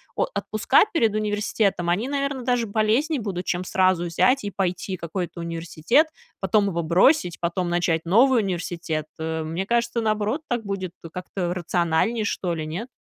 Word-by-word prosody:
о - - +2
отпуска 230 +5 +3
перед 225 -10 +2
университетом- 205 -3 0
они, 200 +8 +1
наверно, 280 -2 -2
даже 245 -1 +1
полезнее 225 +8 +1
будут, 185 -4 -4
чем 175 0 -1
сразу 185 -1 +2
взять 230 +10 +2
и 205 - -2
пойти 185 0 -2
какой-то 170 +1 -5
университет, 170 - +1 0.3
потом 200 +2 +2
его 170 -2 -1
бросить, 180 - +3
потом 175 +1 -1
начать 175 -2 +1
новый 235 +7 +5
университет, 170 -4 -3
э. 160 0 -2
Мне 165 +5 -3
кажется, 235 0 +1
наоборот, 215 +5 0
так 240 -2 -1
будет 195 -3 -3 0.2
как-то 180 -1 -3
рациональнее, 175 +5 0
что 180 -4 -1
ли, 155 -1 -4
нет? 175 +10 -5
190 Hz, 155 wpm, -24 LUFS, 170-225 Hz, 0.3 s, новый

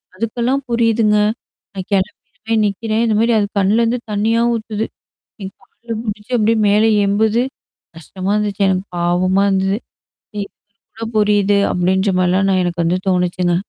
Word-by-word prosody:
அதுக்கெல்லாம் 235 +6 -1
புரியுதுங்க. 230 -2 +2 0.6
நான் 190 -2 -6
கெளம்பிருவேன் 220 +3 -2
நிக்கிறேன். 220 +3 -1
இதுமாரி 225 +2 +2
அது 205 - +1
கண்லேருந்து 230 +5 +2
தண்ணீயா 220 +3 +1
ஊத்துது. 220 -1 -3 0.6
என் 190 0 -6
கால்ல 230 -1 -8
புடிச்சு 210 +2 -6
அப்பிடியே 225 0 +2
மேல 215 +2 +4 0.2
எம்புது 220 +3 +2 0.5
கஷ்டமா 185 +4 -5
இருந்துச்சு. 205 -1 -1
எனக்கு 190 0 0
பாவமா 185 +3 +2
இருந்தது. 195 +1 0 0.6
ம். - - -3
இதுக்கு 200 - -7 0.4
கூட 225 - -6
புரியுது 205 -1 +3
அப்பிடின்ற 190 +2 +1
மாரிலாம் 185 +2 +2
நான் 185 -1 +2
எனக்கு 170 -1 -1
வந்து 180 +2 +1
தோணுச்சுங்க. 180 -1 0
205 Hz, 135 wpm, -17 LUFS, 190-225 Hz, 0.6 s, மேல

